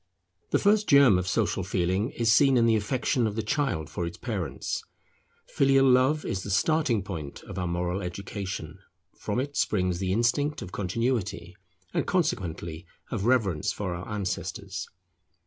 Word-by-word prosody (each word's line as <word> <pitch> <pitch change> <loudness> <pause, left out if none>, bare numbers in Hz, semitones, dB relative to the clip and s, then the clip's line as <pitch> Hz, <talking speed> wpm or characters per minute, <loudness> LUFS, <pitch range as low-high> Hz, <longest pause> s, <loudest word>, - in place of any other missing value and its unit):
The - - +3
first 210 +1 +3
germ 135 -9 +7
of 90 - -3
social 100 -2 0
feeling 95 +4 0
is 115 -1 +1
seen 135 +1 +5
in 115 - +4
the 115 -1 +4
affection 120 +2 0
of 105 - -4
the 110 - -2
child 110 - -1
for 85 - -4
its 85 - -7
parents. - - -3 0.6
Filial 135 -1 +3
love 130 +4 +3
is 95 - -2
the 100 - -7
starting 120 - +2
point 80 -7 -7
of 100 -2 -7
our 90 - -1
moral 90 +2 -1
education: 95 +1 -5 0.4
from - - -2
it 140 +2 -3
springs 90 -4 +1
the 95 -1 -1
instinct 125 +8 +1
of 90 - -9
Continuity, 100 -3 -2 0.4
and - - 0
consequently 90 - -2 0.2
of 100 - -2
reverence 110 -11 +2
for 95 -4 -3
our 85 +2 -7
ancestors. 100 -3 -4
105 Hz, 160 wpm, -27 LUFS, 90-130 Hz, 0.6 s, germ